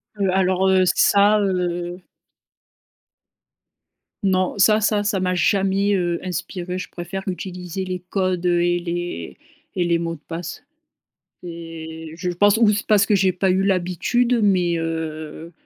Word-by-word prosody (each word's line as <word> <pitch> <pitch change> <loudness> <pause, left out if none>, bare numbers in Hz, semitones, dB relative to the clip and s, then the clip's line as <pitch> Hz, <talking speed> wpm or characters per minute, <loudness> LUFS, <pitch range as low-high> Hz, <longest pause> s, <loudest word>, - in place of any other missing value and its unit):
Heu, 195 -2 0
alors, 190 0 +2
heu, 190 -1 +4
ça, 205 +3 +4
heu 180 -2 -2 2.2
Non. 185 0 +1
Ça 215 +2 +5
ça 210 -1 +1
ça 205 -1 0
m'a 185 0 0
jamais, 195 +1 +2
heu, 175 -2 -1
inspirée. 180 0 -4
Je 185 - -6
préfère 180 +2 -6
utiliser 180 0 -5
les 185 -1 -4
codes, 185 -2 -1
heu, 175 -1 +3
et 175 0 +1
les 175 - -5 0.4
et 180 - +1
les 170 -1 +1
mots 165 0 -3
de 150 - -17
passe 165 0 -6 0.8
et 160 -2 -8
je 180 0 -3
pense 205 +4 +3
ou 225 -2 +5
c'est 210 0 -1
parce 205 -2 +4
que 205 - +2
j'ai 190 -1 +2
pas 185 +1 0
eu 190 +1 +2
l'habitude 195 +6 +1
mais, 180 -4 +2
heu, 160 0 -5
180 Hz, 150 wpm, -21 LUFS, 175-195 Hz, 2.2 s, Ça